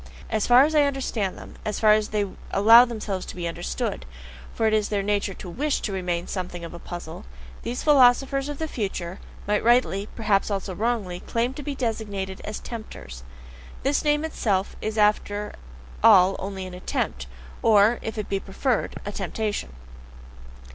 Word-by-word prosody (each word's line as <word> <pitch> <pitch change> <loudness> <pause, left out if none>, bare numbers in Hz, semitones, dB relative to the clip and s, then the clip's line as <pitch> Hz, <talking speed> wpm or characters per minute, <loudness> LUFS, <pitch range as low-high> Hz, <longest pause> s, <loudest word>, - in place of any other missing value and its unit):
As 215 - 0
far 245 +2 +8
as 310 +2 +1
I 300 - +5
understand 255 -8 -2
them, - - -12
as 210 - -3
far 215 -1 +5
as 215 0 +2
they 210 -1 0 0.2
allow 225 +4 +8
themselves 215 -5 -4
to - - -7
be 175 -1 -3
understood 65 - -3 0.5
for 225 - -1
it 220 - +3
is 215 -1 +1
their 205 -2 0
nature 200 -1 -1
to - - -9
WISH 280 - -1
to 210 - -3
remain 180 -2 -2
something 180 -2 -5
of 165 - -9
a 170 - -8
puzzle 175 +1 -8 0.4
these 240 +2 -4
philosophers 275 0 +4
of 290 - -5
the 320 - -3
future 190 - -4 0.3
might 210 +1 +1
rightly, 230 -4 +2
perhaps 210 -3 +1
also 195 -2 -3
wrongly, 205 -4 -1
claim 235 +6 -1
to 290 - -7
be 285 -1 -4
designated 205 -6 -3
as 210 - -4
"tempters." 215 - -8 0.6
This 280 +2 +1
name 295 +1 +2
itself 205 -11 -1
is 215 0 -3
after 210 0 +1 0.5
all 195 -3 +7
only 195 -1 -5
an 185 - -8
attempt, 65 - -3 0.3
or, 215 +1 +5
if 220 - -5
it 210 - -3
be 195 - -1
preferred, 220 +6 -1
a 205 - -3
temptation. 205 - -3
210 Hz, 175 wpm, -25 LUFS, 190-240 Hz, 0.6 s, far